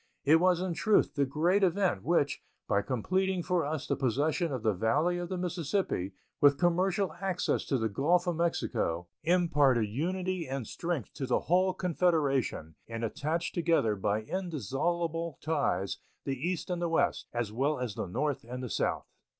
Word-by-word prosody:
It 155 Hz, +3 st, +7 dB
was 180 Hz, 0 st, +3 dB
in 185 Hz, -2 st, -1 dB
truth 215 Hz, +5 st, +2 dB
the 140 Hz, -1 st, +1 dB
great 175 Hz, +8 st, +2 dB
event 185 Hz, -, +2 dB
which, 145 Hz, -, +1 dB, 0.3 s
by 100 Hz, -2 st, +2 dB
completing 185 Hz, -, 0 dB
for 180 Hz, -1 st, +1 dB
us 150 Hz, 0 st, -3 dB
the -, -, 0 dB
possession 145 Hz, -, 0 dB
of 130 Hz, -4 st, -3 dB
the 110 Hz, -2 st, +3 dB
Valley 150 Hz, -, +1 dB
of 175 Hz, -1 st, -4 dB
the 185 Hz, -, -2 dB
Mississippi, 175 Hz, -, -1 dB, 0.3 s
with 140 Hz, -1 st, +6 dB
commercial 180 Hz, +1 st, +1 dB
access 190 Hz, -2 st, 0 dB
to 135 Hz, -, +1 dB
the 110 Hz, -2 st, 0 dB
Gulf 165 Hz, -, +2 dB
of 175 Hz, -2 st, 0 dB
Mexico, 90 Hz, -, -1 dB, 0.2 s
imparted 145 Hz, -9 st, +3 dB
unity 180 Hz, -, -2 dB
and 135 Hz, -2 st, -3 dB
strength 165 Hz, -, -4 dB
to 135 Hz, -, -4 dB
the 125 Hz, -, +2 dB
whole 185 Hz, +2 st, +2 dB
Confederation 150 Hz, -, 0 dB
and 115 Hz, 0 st, -5 dB
attached 155 Hz, +9 st, -2 dB
together 165 Hz, -11 st, +2 dB
by 105 Hz, +2 st, -1 dB
indissoluble 165 Hz, -, -2 dB
ties 140 Hz, -, -1 dB, 0.2 s
the 135 Hz, -, -2 dB
East 175 Hz, +6 st, -3 dB
and 175 Hz, -1 st, -2 dB
the 170 Hz, -, 0 dB
West, 165 Hz, -, +1 dB
as 120 Hz, -3 st, -2 dB
well 140 Hz, +5 st, +1 dB
as 125 Hz, -4 st, -3 dB
the 100 Hz, -, -4 dB
North 140 Hz, +9 st, -1 dB
and 125 Hz, +2 st, -6 dB
the 125 Hz, -, -5 dB
South. -, -, -1 dB
155 Hz, 170 wpm, -30 LUFS, 125-175 Hz, 0.3 s, It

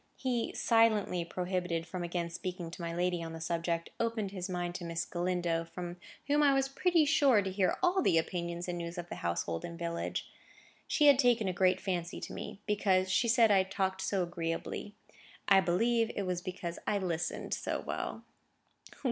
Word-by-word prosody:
He, 245 Hz, -3 st, -1 dB
silently 220 Hz, -6 st, +3 dB
prohibited 180 Hz, -1 st, -2 dB
from 175 Hz, +1 st, -5 dB
again 170 Hz, -1 st, -2 dB
speaking 175 Hz, -1 st, -5 dB
to 175 Hz, -, -8 dB
my 170 Hz, 0 st, -3 dB
lady 175 Hz, 0 st, 0 dB
on 165 Hz, 0 st, -6 dB
the 165 Hz, -, -6 dB
subject, 165 Hz, +1 st, -2 dB
opened 225 Hz, -4 st, -1 dB
his 185 Hz, -2 st, -5 dB
mind 175 Hz, -1 st, -2 dB
to 180 Hz, -, -6 dB
Miss 170 Hz, 0 st, -2 dB
Galindo, 175 Hz, -1 st, -1 dB
from 175 Hz, +1 st, -7 dB, 0.3 s
whom 290 Hz, +2 st, +3 dB
I 280 Hz, -2 st, +5 dB
was 270 Hz, 0 st, +2 dB
pretty 330 Hz, +3 st, +3 dB
sure 275 Hz, -8 st, +4 dB
to 190 Hz, -, -3 dB
hear 190 Hz, -1 st, +1 dB
all 365 Hz, +2 st, +4 dB
the 165 Hz, -, +3 dB
opinions 170 Hz, +1 st, -2 dB
and 175 Hz, -1 st, -3 dB
news 170 Hz, +1 st, -5 dB
of 175 Hz, 0 st, -5 dB
the -, -, -5 dB
household 85 Hz, -1 st, -2 dB
and 170 Hz, -1 st, -6 dB
village. 170 Hz, 0 st, -3 dB, 0.6 s
She 300 Hz, -, +3 dB
had 285 Hz, -2 st, +7 dB
taken 240 Hz, -5 st, +4 dB
a 185 Hz, -, 0 dB
great 185 Hz, 0 st, +3 dB
fancy 175 Hz, -3 st, -3 dB
to -, -, -6 dB
me, 200 Hz, -, -7 dB
because 190 Hz, -3 st, +2 dB
she 235 Hz, -, +3 dB
said 230 Hz, -1 st, +5 dB
I 195 Hz, -2 st, +6 dB
talked 190 Hz, 0 st, -1 dB
so 195 Hz, -2 st, 0 dB
agreeably. 170 Hz, +4 st, -4 dB, 0.5 s
I 195 Hz, -1 st, +7 dB
believe 230 Hz, +6 st, +2 dB
it 200 Hz, -, -1 dB
was 180 Hz, -2 st, -2 dB
because 180 Hz, -2 st, -5 dB
I 210 Hz, -, +2 dB
listened 175 Hz, -3 st, -2 dB
so -, -, -2 dB
well. -, -, -4 dB
180 Hz, 190 wpm, -32 LUFS, 170-210 Hz, 0.6 s, had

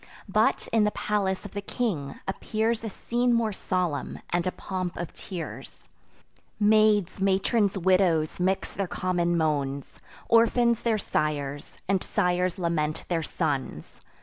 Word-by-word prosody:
But, -, -, +2 dB
in 225 Hz, -2 st, +5 dB
the 210 Hz, -, +3 dB
palace 200 Hz, -2 st, 0 dB
of 205 Hz, -, -7 dB
the 200 Hz, -, -4 dB
king, 190 Hz, -, -3 dB
appears 220 Hz, +3 st, -1 dB
A 225 Hz, -, -3 dB
scene 240 Hz, +4 st, 0 dB
more 230 Hz, -3 st, +2 dB
solemn, 180 Hz, -6 st, -2 dB
and 175 Hz, +1 st, +1 dB
a -, -, +1 dB
pomp 185 Hz, -2 st, -4 dB
of 170 Hz, -2 st, -5 dB
tears. 180 Hz, -4 st, -8 dB, 0.7 s
Maids, 210 Hz, -3 st, +4 dB
matrons, 195 Hz, +1 st, +2 dB
widows, 180 Hz, -4 st, +2 dB
mix 190 Hz, +2 st, 0 dB
their 195 Hz, -2 st, -2 dB
common 175 Hz, -1 st, 0 dB
moans; 140 Hz, -4 st, -1 dB, 0.3 s
Orphans 235 Hz, 0 st, +4 dB
their 230 Hz, -2 st, +1 dB
sires, 145 Hz, -6 st, -2 dB
and 190 Hz, -1 st, +1 dB
sires 180 Hz, +1 st, +1 dB
lament 160 Hz, -4 st, -1 dB
their 170 Hz, -2 st, +1 dB
sons. 155 Hz, -, -3 dB
190 Hz, 135 wpm, -27 LUFS, 170-210 Hz, 0.7 s, in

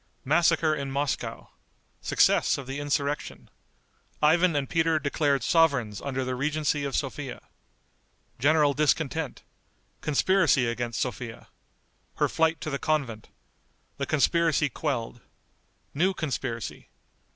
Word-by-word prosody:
Massacre 160 Hz, +1 st, +3 dB
in 140 Hz, -2 st, -3 dB
Moscow. 140 Hz, +1 st, -3 dB, 0.5 s
Success -, -, +3 dB
of 140 Hz, -, -7 dB
the 135 Hz, +2 st, -5 dB
Insurrection. 145 Hz, 0 st, -3 dB, 0.7 s
Ivan 165 Hz, +2 st, +4 dB
and 140 Hz, -2 st, 0 dB
Peter 160 Hz, +1 st, +2 dB
Declared 140 Hz, -2 st, 0 dB
Sovereigns 125 Hz, -, +2 dB
under 135 Hz, -2 st, -3 dB
the 130 Hz, -, -2 dB
Regency 150 Hz, +2 st, 0 dB
of 140 Hz, -, -3 dB
Sophia. 135 Hz, -1 st, -3 dB, 1.0 s
General 145 Hz, +2 st, +4 dB
Discontent. 155 Hz, 0 st, 0 dB, 0.6 s
Conspiracy 155 Hz, -2 st, +3 dB
against 120 Hz, -1 st, -2 dB
Sophia. 120 Hz, -1 st, -5 dB, 0.7 s
Her -, -, +2 dB
Flight 160 Hz, -1 st, +1 dB
to 155 Hz, -, -4 dB
the 140 Hz, -, -2 dB
Convent. 135 Hz, -8 st, -2 dB, 0.7 s
The 140 Hz, -, -3 dB
Conspiracy 155 Hz, 0 st, +2 dB
Quelled. 120 Hz, -4 st, -3 dB, 0.7 s
New 185 Hz, +6 st, +1 dB
Conspiracy. 130 Hz, -, -4 dB
145 Hz, 110 wpm, -27 LUFS, 130-155 Hz, 1.0 s, Ivan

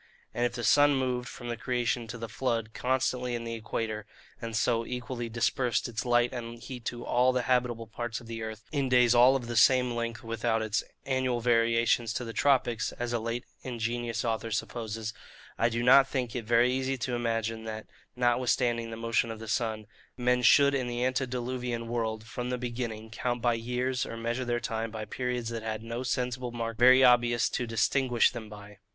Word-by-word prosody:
And 120 Hz, 0 st, +1 dB
if 120 Hz, -, -9 dB
the 120 Hz, -1 st, -5 dB
sun 145 Hz, +4 st, +5 dB
moved 125 Hz, -2 st, -1 dB
from 120 Hz, +2 st, -9 dB
the 120 Hz, -, -2 dB
creation 120 Hz, -1 st, -1 dB
to 120 Hz, +2 st, -6 dB
the 115 Hz, 0 st, -5 dB
flood 115 Hz, -1 st, -2 dB
constantly 125 Hz, -1 st, 0 dB
in 115 Hz, -, -4 dB
the 115 Hz, 0 st, -4 dB
equator, 110 Hz, -1 st, -4 dB, 0.3 s
and 115 Hz, -1 st, -4 dB
so 115 Hz, +1 st, +2 dB
equally 120 Hz, 0 st, -5 dB
dispersed 120 Hz, +1 st, 0 dB
its 115 Hz, 0 st, -4 dB
light 120 Hz, 0 st, +3 dB
and 120 Hz, -1 st, -6 dB
heat 120 Hz, 0 st, -9 dB
to 120 Hz, 0 st, -4 dB
all 125 Hz, +1 st, +3 dB
the 125 Hz, -1 st, 0 dB
habitable 125 Hz, -3 st, +1 dB
parts 115 Hz, +1 st, -5 dB
of 120 Hz, -, -14 dB
the 115 Hz, 0 st, -6 dB
earth, 110 Hz, 0 st, -6 dB
in 140 Hz, -4 st, 0 dB
days 125 Hz, -1 st, +5 dB
all 125 Hz, +2 st, +6 dB
of 130 Hz, -3 st, -2 dB
the 120 Hz, 0 st, -4 dB
same 125 Hz, +2 st, +5 dB
length 115 Hz, -1 st, -3 dB
without 115 Hz, 0 st, -1 dB
its 110 Hz, -1 st, 0 dB, 0.2 s
annual 130 Hz, -2 st, 0 dB
variations 115 Hz, -1 st, +2 dB
to 125 Hz, -, -3 dB
the 115 Hz, -, -6 dB
tropics, 120 Hz, -6 st, +2 dB
as 120 Hz, 0 st, -4 dB
a 120 Hz, -, +1 dB
late 115 Hz, +2 st, -3 dB, 0.2 s
ingenious 120 Hz, -1 st, -3 dB
author 115 Hz, 0 st, -1 dB
supposes, 110 Hz, 0 st, -3 dB, 0.5 s
I 115 Hz, -, +3 dB
do 120 Hz, 0 st, -2 dB
not 135 Hz, +2 st, +7 dB
think 130 Hz, -4 st, -3 dB
it 120 Hz, -3 st, -3 dB
very 120 Hz, +2 st, +4 dB
easy 130 Hz, +1 st, -1 dB
to 125 Hz, +1 st, -3 dB
imagine, 115 Hz, -1 st, -2 dB
that 110 Hz, 0 st, -5 dB, 0.3 s
(notwithstanding 120 Hz, -1 st, +1 dB
the 115 Hz, -, -6 dB
motion 115 Hz, 0 st, 0 dB
of 115 Hz, -, -5 dB
the 110 Hz, 0 st, -9 dB
sun) 110 Hz, 0 st, -1 dB, 0.3 s
men 125 Hz, 0 st, +2 dB
should 140 Hz, +3 st, +6 dB
in 130 Hz, -3 st, 0 dB
the 120 Hz, +1 st, -1 dB
antediluvian 125 Hz, -2 st, -2 dB
world, 110 Hz, -2 st, -2 dB
from 125 Hz, +1 st, -5 dB
the 125 Hz, -, -1 dB
beginning, 115 Hz, -3 st, -5 dB
count 120 Hz, +3 st, -2 dB
by 120 Hz, 0 st, +2 dB
years, 125 Hz, +2 st, -1 dB
or 115 Hz, -, -6 dB
measure 120 Hz, +2 st, -2 dB
their 120 Hz, 0 st, 0 dB
time 115 Hz, -1 st, -3 dB
by 110 Hz, -1 st, -6 dB
periods 125 Hz, -1 st, -3 dB
that 115 Hz, -1 st, -4 dB
had 110 Hz, 0 st, -4 dB
no 115 Hz, +2 st, -4 dB
sensible 125 Hz, 0 st, -2 dB
mark 115 Hz, -1 st, -4 dB
very 130 Hz, +2 st, +7 dB
obvious 120 Hz, -1 st, +4 dB
to 120 Hz, -, -2 dB
distinguish 120 Hz, +1 st, +2 dB
them 115 Hz, -3 st, -8 dB
by. 105 Hz, -1 st, -12 dB
120 Hz, 200 wpm, -29 LUFS, 115-125 Hz, 0.5 s, not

